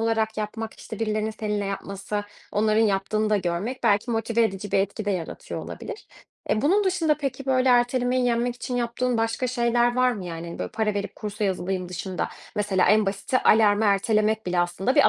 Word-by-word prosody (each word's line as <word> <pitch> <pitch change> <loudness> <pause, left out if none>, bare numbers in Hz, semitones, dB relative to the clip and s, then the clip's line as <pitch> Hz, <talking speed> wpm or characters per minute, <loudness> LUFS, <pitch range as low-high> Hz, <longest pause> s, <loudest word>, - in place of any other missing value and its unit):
olarak 225 -1 0
yapmak, 220 +1 -4
işte, 220 - -8
birilerinin 215 -1 -1
seninle 210 -2 -2
yapması, 200 +1 -4 0.3
onların 215 +1 +2
yaptığını 215 +1 +1
da 210 - +4
görmek 195 +7 -2
belki 205 +4 +3
motive 230 +1 +1
edici 200 -2 -2
bir - - +4
etki 200 +2 -1
de 205 - 0
yaratıyor 175 -4 -4
olabilir. - - -8 0.4
Eee, 215 - +1
bunun 390 +7 +3
dışında 335 -5 +2
peki, 275 -2 -4
böyle, 260 0 +3
ertelemeyi 245 +1 +3
yenmek 240 0 +1
için 245 +1 -4
yaptığın 245 +1 0
başka 225 +3 0
şeyler 240 0 +2
var 255 0 +4
mı? 200 -6 -6
Yani 165 -1 -6
hani, 170 - -7
böyle - - -4
para 220 -1 0
verip 200 0 -3
kursa 210 0 -4
yazılayım 185 -1 -1
dışında, 180 +1 -3 0.3
mesela 200 -3 +2
en 215 -1 +4
basiti 200 +6 0
alarmı 215 0 +4
ertelemek 215 +2 +2
bile 180 -1 +1
aslında 175 +8 0
bir 295 - +6
215 Hz, 185 wpm, -25 LUFS, 200-240 Hz, 0.4 s, bir